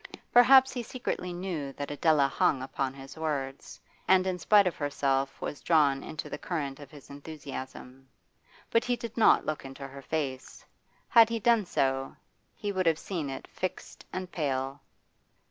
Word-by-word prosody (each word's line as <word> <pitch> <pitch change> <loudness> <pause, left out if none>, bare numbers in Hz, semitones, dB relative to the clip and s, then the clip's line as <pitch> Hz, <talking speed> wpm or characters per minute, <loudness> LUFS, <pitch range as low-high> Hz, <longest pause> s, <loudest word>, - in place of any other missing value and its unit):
Perhaps 260 +2 +7
he 250 - -3
secretly 235 -6 -4
knew 175 -6 -4
that 145 +1 -5
Adela 145 -1 +3
hung 135 -1 +1
upon 135 0 -2
his 135 0 -11
words, 140 -4 -4 0.3
and 185 0 +5
in 185 -1 -1
spite 205 +2 +5
of 180 - 0
herself 135 -2 -1
was 145 - -5
drawn 145 -4 +3
into 155 -1 -6
the 145 - -6
current 145 -6 -4
of 145 -2 -11
his 145 -1 -14
enthusiasm. 135 -3 -9 0.6
But 230 - +3
he 245 - 0
did 235 -1 -7
not 225 - +5
look 155 -1 -3
into 135 +1 -8
her 140 0 -10
face. 135 -3 -4 0.4
Had 230 -1 +7
he 230 0 -1
done 225 -3 +3
so 135 -2 0 0.4
he 205 - -3
would 185 -3 0
have 160 -2 +4
seen 165 -5 -4
it 135 - -7
fixed 185 0 -5
and 185 -1 -5
pale. 135 -3 -2
150 Hz, 165 wpm, -29 LUFS, 135-185 Hz, 0.6 s, Perhaps